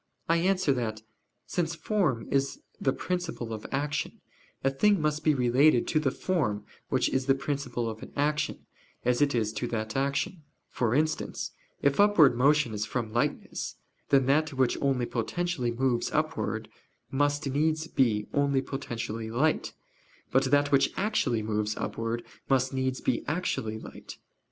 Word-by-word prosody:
I 165 - +3
answer 185 -3 +2
that, 110 -4 -3 0.4
Since 170 -1 -1
form 160 - 0
is 135 0 +1 0.2
the 135 - +2
principle 165 -10 -3
of 110 - -6
action, 145 +2 -2 0.4
a 135 - +3
thing 200 +8 +3
must 150 0 0
be 155 -1 +4
related 125 +1 +4
to 155 - +3
the 150 -3 +1
form 125 - -1 0.2
which - - +2
is 130 0 -1
the 135 - +5
principle 135 -4 -2
of 110 -1 -5
an - - -9
action, 150 +1 0 0.4
as 125 +2 +2
it 145 -3 +3
is 110 -2 0
to 120 - -2
that 110 -2 -3
action: 140 +7 -1 0.3
for 120 -1 0
instance, 155 +2 -1 0.3
if 140 +4 +2
upward 190 -11 +6
motion 140 -1 +3
is 105 0 -2
from 110 -1 -3
lightness, 120 - -2 0.3
then 135 -2 +4
that 150 +3 +2
which 130 -2 +2
only 135 -3 +1
potentially 130 +3 -1
moves 120 0 0
upwards 150 -8 -1 0.4
must 145 +1 +1
needs 155 +3 +1
be 115 -9 +1
only 140 -2 +2
potentially 115 -5 -4
light, 140 +8 +1 0.6
but 135 +1 +3
that 145 +2 +3
which 140 -1 +4
actually 190 - +1
moves 105 0 -1
upwards 115 +1 -3 0.3
must 130 0 +2
needs 130 0 -1
be 120 - 0
actually 145 -9 -1
light. - - -10
135 Hz, 155 wpm, -28 LUFS, 120-150 Hz, 0.6 s, upward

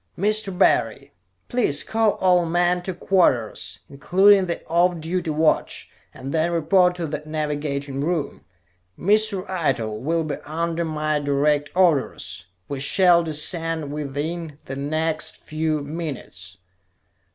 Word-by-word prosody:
"Mr. 205 -1 -1
Barry, 190 - +2 0.3
please 240 - +1
call 220 -1 +1
all 180 -2 +3
men 175 +1 +1
to 185 - -4
quarters, 170 - 0
including 190 +7 +4
the 170 - -4
off 175 +1 +2
duty 170 +2 -2
watch, 155 +1 0 0.2
and 135 +2 -7
then 160 +1 +1
report 180 +2 +3
to 175 -2 -3
the 150 -1 -4
navigating 145 -3 -3
room. 160 -3 -2 0.5
Mr. 205 0 +1
Eitel 130 - -1
will 165 +6 0
be 150 -2 -3
under 165 +2 -2
my 155 -1 -1
direct 145 +1 +1
orders. 155 - +1 0.2
We 140 - -4
shall 175 +5 +4
descend 160 -1 -1
within 150 +2 -4
the 135 - -6
next 155 +3 -2
few 155 -1 -1
minutes." 140 - -6
160 Hz, 125 wpm, -23 LUFS, 145-180 Hz, 0.5 s, including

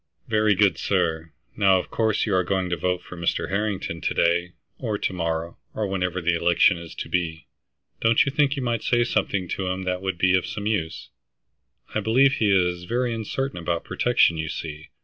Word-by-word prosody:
"Very 110 -2 +3
good, 95 -5 +3
sir. 80 -4 0 0.2
Now 95 -2 +4
of 90 - -5
course 110 -2 +1
you 105 - -1
are 95 0 +3
going 95 0 -1
to - - +2
vote 90 0 -1
for - - -10
Mr. 85 -1 -1
Harrington 95 -4 -2
to - - -1
day, 85 +1 +1 0.3
or 110 -5 -2
to 95 - -2
morrow, 85 -1 -3 0.2
or 110 - -1
whenever 95 -2 -2
the 85 +1 +2
election 85 +1 +3
is 85 -1 -10
to - - -5
be. 80 -3 -2 0.5
Don't 115 0 +4
you 140 - -1
think 145 0 +2
yon 135 - -3
might 120 -1 0
say 120 -1 +2
something 100 -5 -1
to 95 - -2
him 95 +1 -2
that 90 0 -2
would 95 -2 -2
be 90 +1 +3
of 95 - 0
some 105 - -5
use? 100 -7 -2 0.8
I - - +1
believe 130 +6 +4
he 110 -5 +1
is 90 -2 +2
very 120 +3 0
uncertain 115 0 -3
about 85 0 -2
protection, 120 -9 +2
you 80 -1 -3
see. 75 -1 -6
95 Hz, 205 wpm, -24 LUFS, 85-110 Hz, 0.8 s, Now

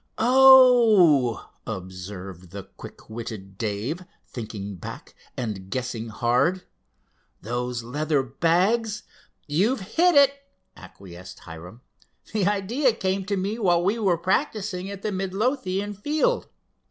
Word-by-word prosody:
"Oh!" 235 - +6 0.2
observed 95 -2 -8 0.2
quick - - -12
witted 110 -4 -8
Dave, 115 - -3 0.2
thinking 105 -4 -7
back, - - -9 0.2
and 105 -6 -5
guessing 120 -1 -4
hard, 125 - +1 0.8
"those 120 +2 -3
leather 145 +3 -1
bags——" 185 - 0 0.4
"You've 200 - +1
hit 340 - +2
it," 280 -1 +6 0.4
acquiesced 95 -1 -12
Hiram. 90 +7 -11 0.5
"The 205 -3 +1
idea 220 +6 +1
came 190 -3 -2
to 200 0 -1
me 200 +5 -2
while 175 -5 +2
we 205 +5 0
were 190 -5 +2
practicing 195 - -1
at 200 -1 -8
the 215 - -1
Midlothian 195 +1 -2
field. 310 - 0
175 Hz, 110 wpm, -24 LUFS, -, 0.8 s, Oh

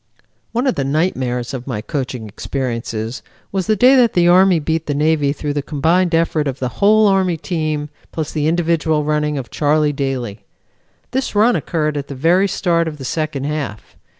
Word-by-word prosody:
One 240 +3 -1
of 260 - +2
the 140 - -2
nightmares 130 -5 -1
of 125 -1 -6
my 120 -6 -3
coaching 125 -2 -4
experiences 115 +1 -4 0.3
was 190 -2 -2
the 215 - +3
day 250 +6 +6
that 240 -3 +4
the 175 -1 +3
Army 185 0 +5
beat 160 +1 -2
the 145 - -1
Navy 150 -1 +2
through 145 0 -3
the 145 - -1
combined 165 +5 +1
effort 165 -2 +1
of 135 -1 -3
the 130 -2 -2
whole 215 +2 +5
Army 190 -3 +2
team 155 -3 -2 0.2
plus 155 -2 -4
the 150 -1 -1
individual 160 -2 +1
running 150 0 0
of 130 -3 -6
Charlie 150 0 +2
Daly. 130 -6 -3 0.7
This 260 -3 -2
run 225 +4 +4
occurred 155 -3 -1
at 140 - -4
the 140 - -7
very 175 +8 +3
start 170 -3 0
of 155 -2 -5
the 135 - -8
second 155 -1 -2
half. 140 -8 -4
150 Hz, 185 wpm, -18 LUFS, 140-175 Hz, 0.7 s, day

